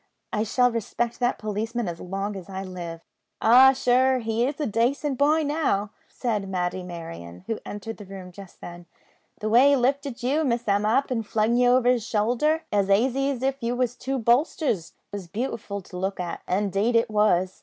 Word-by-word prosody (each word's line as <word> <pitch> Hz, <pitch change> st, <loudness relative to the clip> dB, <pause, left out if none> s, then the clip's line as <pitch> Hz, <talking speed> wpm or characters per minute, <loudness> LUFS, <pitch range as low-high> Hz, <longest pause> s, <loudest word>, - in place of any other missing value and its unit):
I 210 Hz, -, +1 dB
shall 245 Hz, +3 st, +2 dB
respect 235 Hz, +1 st, -2 dB
that 245 Hz, 0 st, +1 dB
policeman 220 Hz, +2 st, -3 dB
as 170 Hz, -1 st, -5 dB
long 195 Hz, +3 st, -4 dB
as 190 Hz, -1 st, -9 dB
I 190 Hz, 0 st, -5 dB
live." 175 Hz, -3 st, -7 dB, 0.4 s
"Ah, 255 Hz, +4 st, +7 dB
sure 260 Hz, 0 st, +3 dB
an' 255 Hz, -, -2 dB
he 225 Hz, +2 st, 0 dB
is 285 Hz, +2 st, -4 dB
a 300 Hz, -, 0 dB
dacent 255 Hz, +5 st, 0 dB
boy 305 Hz, +3 st, +3 dB
now," 285 Hz, -9 st, 0 dB, 0.2 s
said 210 Hz, -6 st, -3 dB
Matty 180 Hz, 0 st, -2 dB
Merryon, 90 Hz, -, -9 dB
who 225 Hz, -, -3 dB
entered 225 Hz, +2 st, -6 dB
the 205 Hz, -, -10 dB
room 190 Hz, -1 st, -9 dB
just 195 Hz, 0 st, -13 dB
then; 175 Hz, 0 st, -10 dB, 0.5 s
"the 215 Hz, -, -2 dB
way 245 Hz, +6 st, +6 dB
he 285 Hz, -, +5 dB
lifted 270 Hz, -1 st, -1 dB
you 275 Hz, +5 st, +1 dB
an' 315 Hz, -, +1 dB
Miss 235 Hz, 0 st, -1 dB
Emma 205 Hz, +1 st, +2 dB
up 270 Hz, +4 st, +1 dB
an' 235 Hz, -3 st, 0 dB
flung 220 Hz, +2 st, 0 dB
ye 245 Hz, 0 st, +4 dB
over 250 Hz, 0 st, +4 dB
his 250 Hz, -3 st, +3 dB
showlder, 245 Hz, +9 st, +1 dB
as 200 Hz, -1 st, +1 dB
aisy 260 Hz, +7 st, +2 dB
as 260 Hz, -3 st, -3 dB
if 270 Hz, 0 st, -1 dB
ye 235 Hz, 0 st, -1 dB
was 245 Hz, -1 st, -1 dB
two 270 Hz, +1 st, -3 dB
bolsters, 240 Hz, -, +1 dB, 0.2 s
was 200 Hz, -3 st, -6 dB
beautiful 205 Hz, 0 st, -4 dB
to 180 Hz, -, -13 dB
look 190 Hz, +1 st, -3 dB
at; 175 Hz, -1 st, -4 dB
indade 200 Hz, +4 st, 0 dB
it 230 Hz, 0 st, +2 dB
was. 190 Hz, -4 st, +2 dB
225 Hz, 200 wpm, -25 LUFS, 195-255 Hz, 0.5 s, Ah